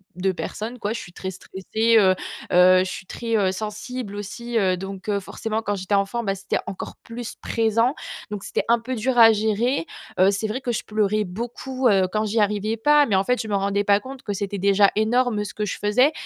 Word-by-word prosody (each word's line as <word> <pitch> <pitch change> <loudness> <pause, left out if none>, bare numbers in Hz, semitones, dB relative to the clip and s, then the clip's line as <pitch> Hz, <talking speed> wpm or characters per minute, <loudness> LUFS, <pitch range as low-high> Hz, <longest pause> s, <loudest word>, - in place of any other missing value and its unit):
de 190 +1 0
personne, 225 +6 -5
quoi. 205 -1 -2
Je 230 - -3
suis 175 - -11
très 190 +1 -5
stressée, 220 +5 -1
heu, 190 -3 +6 0.4
heu, 185 +1 +6
je 185 - +3
suis 190 - -7
très, 230 +3 -2
heu, 190 -2 +2
sensible 215 +2 -5
aussi, 235 +4 -4
heu, 190 -4 +3
donc, 195 +1 -7
heu, 205 -1 +1
forcément 220 +3 -3
quand 205 -2 -2
j'étais 190 +1 -1
enfant, 200 +4 0
bah, 195 -2 -1
c'était 195 - -2
encore 195 -1 -6
plus 235 0 -7
présent 230 +4 +1 0.4
donc 205 -2 -5
c'était - - -1
un 235 0 +4
peu 255 +3 -4
dur 250 +2 -1
à 225 -1 +9
gérer. 220 -1 0 0.3
Heu, 185 +1 +6
c'est 200 +2 -2
vrai 245 +5 -2
que 245 -2 -2
je - - -2
pleurais 215 0 0
beaucoup, 240 +6 -3
heu, 195 -3 +4
quand 215 0 0
j'y 220 +2 0
arrivais 210 +1 0
pas. 295 +4 +5
Mais 205 - +1
en 190 - +3
fait, 250 +4 +1
je 220 - -6
me 205 - -1
rendais 200 +1 +1
pas 200 0 +4
compte 265 0 -10
que 205 - -3
c'était 200 +1 -3
déjà 200 +1 +4
énorme 220 0 +2
ce - - -7
que 210 - -3
je - - -4
faisais. 250 +8 +3
210 Hz, 230 wpm, -23 LUFS, 195-230 Hz, 0.4 s, à